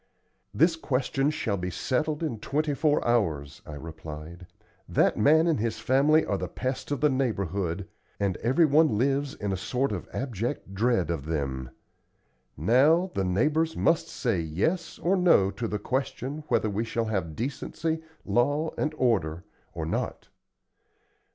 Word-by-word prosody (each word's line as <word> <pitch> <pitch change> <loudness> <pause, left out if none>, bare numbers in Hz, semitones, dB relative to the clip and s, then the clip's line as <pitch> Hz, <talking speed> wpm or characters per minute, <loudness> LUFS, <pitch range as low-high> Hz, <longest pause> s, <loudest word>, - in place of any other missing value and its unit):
"This 165 +3 +3
question 135 -1 0
shall 110 -9 -1
be 90 0 -3
settled 150 - -1
in 125 -9 -2
twenty 150 +5 -1
four 150 -1 +1
hours!" 80 -12 0
I 75 - -7
replied. 80 +2 -9 0.4
"That - - +3
man 155 +9 +5
and 165 -7 +2
his 115 +1 -1
family 145 +5 +3
are - - -1
the - - -3
pest 130 0 -4
of 145 - -2
the 150 - +5
neighborhood, 100 -8 -1 0.3
and 100 -3 0
everyone 145 0 +3
lives 140 +3 0
in 105 -2 -3
a 95 - -1
sort 125 +8 -1
of - - -5
abject 120 -4 -3
dread 110 -4 +1
of 75 -3 -4
them. 65 -5 -2 0.9
Now, 145 - +4
the 95 - 0
neighbors 150 - +1
must 165 - +2
say 115 -9 -1
'yes' 95 - -1
or 185 +3 +1
'no' 170 - +4
to 115 - -4
the 105 - -2
question 135 +5 -3
whether - - +2
we 105 +2 -1
shall 115 0 -2
have 95 -8 -2
decency, 155 +6 -3 0.2
law, 145 +6 +1
and 155 0 -1
order, 90 -9 +1 0.3
or 80 -2 -3
not. 80 - -3
120 Hz, 150 wpm, -27 LUFS, 95-150 Hz, 0.9 s, man